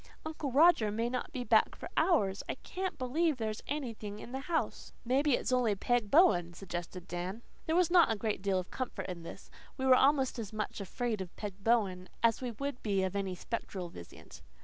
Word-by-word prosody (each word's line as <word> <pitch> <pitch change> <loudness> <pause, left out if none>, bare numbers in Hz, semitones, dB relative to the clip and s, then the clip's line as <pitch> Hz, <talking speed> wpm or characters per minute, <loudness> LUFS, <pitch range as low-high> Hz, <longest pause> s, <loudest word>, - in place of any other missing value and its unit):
Uncle 310 -3 -4
Roger 285 -5 +5
may 225 +3 -1
not 255 +4 -3
be 255 -5 -3
back - - +3
for - - -8
hours. 205 - +2
I - - -1
CAN'T 375 0 -5
believe 295 +4 +1
there's 220 -2 -3
anything 230 -8 -4
in 225 - -9
the 265 - -3
house." 320 +4 -2
"Maybe 270 +3 +3
it's - - -2
only 245 -5 +3
Peg 240 +1 0
Bowen," 190 - +5
suggested 175 -1 -6
Dan. 180 +6 -4 0.2
There 320 - +1
was 355 -1 +3
not 345 -8 +6
a - - +1
great 215 -2 -2
deal 195 -1 +1
of 185 0 -4
comfort 255 -1 -4
in 180 -2 -6
this. 165 - -10 0.3
We 265 - -2
were 260 - +7
almost 265 -1 +3
as 215 -3 -5
much 215 -1 -4
afraid 220 +2 -2
of 180 -2 -8
Peg 200 -2 -7
Bowen 195 -6 +1
as 230 +1 +3
we 250 - -2
would 275 +3 -4
be 195 -3 +1
of 190 +1 -2
any 195 -2 -2
spectral 185 -3 -5
visitant. 85 - -12
230 Hz, 205 wpm, -32 LUFS, 195-265 Hz, 0.3 s, were